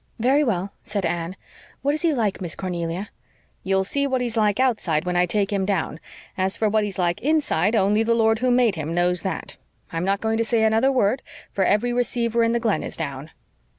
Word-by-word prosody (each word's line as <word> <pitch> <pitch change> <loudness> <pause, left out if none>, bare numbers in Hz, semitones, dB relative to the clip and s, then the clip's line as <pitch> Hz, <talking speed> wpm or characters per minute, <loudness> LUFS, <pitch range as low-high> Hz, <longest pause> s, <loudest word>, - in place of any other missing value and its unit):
"Very 265 +6 +3
well," 195 -6 -1
said 200 -3 -2
Anne. 170 +2 -2 0.5
"What 285 +1 +2
is 305 - -3
he 335 - +2
like, 220 -9 -1
Miss 175 -3 -4
Cornelia?" 180 +1 -4 0.5
"You'll 190 0 +1
see 280 +8 +1
what 260 -1 0
he's 240 -2 -2
like 210 0 +2
outside 210 -11 +1
when 180 0 -1
I 180 0 +3
take 205 +2 0
him 195 -1 0
down. 190 -5 -1 0.4
As 190 0 0
for 220 - +1
what 215 0 +2
he's 205 -2 -4
like 175 -2 0
inside 245 - +1
only 210 +1 +3
the 230 +1 +2
Lord 225 -1 +3
who 255 +1 +1
made 245 -3 +3
him 160 -1 -4
knows 175 0 +1
THAT. 190 -5 -5 0.4
I'm 165 +1 -1
not 195 +1 +1
going 220 +1 -1
to - - +3
say 225 -1 +1
another 225 +5 +3
word, 255 0 +1 0.3
for 195 - 0
every 210 +6 +2
receiver 235 -1 0
in 230 - +2
the 235 - +1
Glen 225 -3 0
is - - -6
down." 140 -1 -5
210 Hz, 220 wpm, -23 LUFS, 180-235 Hz, 0.5 s, Very